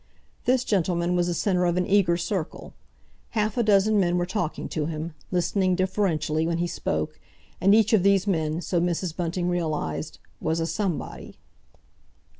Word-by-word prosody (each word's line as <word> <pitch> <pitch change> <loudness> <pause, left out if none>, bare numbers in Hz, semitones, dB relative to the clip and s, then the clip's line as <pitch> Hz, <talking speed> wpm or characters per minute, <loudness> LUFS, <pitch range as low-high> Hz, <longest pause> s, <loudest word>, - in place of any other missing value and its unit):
This 255 0 +3
gentleman 180 -4 +1
was 175 -1 +2
the 175 - 0
centre 180 -1 +1
of 175 0 +1
an 180 - +1
eager 185 -4 +3
circle; 175 -1 -4 0.6
half 215 0 +1
a 245 - +2
dozen 210 -1 +4
men 175 -2 +2
were 175 - +1
talking 175 -3 -3
to 150 -2 -2
him, 160 0 -4 0.2
listening 180 +1 +1
deferentially 175 -5 0
when 170 0 0
he 175 - 0
spoke, 155 -2 -3 0.4
and 195 +3 +6
each 220 0 +3
of 215 - +5
these 195 0 +3
men, 160 -4 0
so 175 -1 0
Mrs. 175 -1 -1
Bunting 175 0 -2
realised, 155 - -2 0.2
was 160 +1 -1
a 165 - 0
Somebody. 175 +1 -4
175 Hz, 165 wpm, -25 LUFS, 165-195 Hz, 0.6 s, and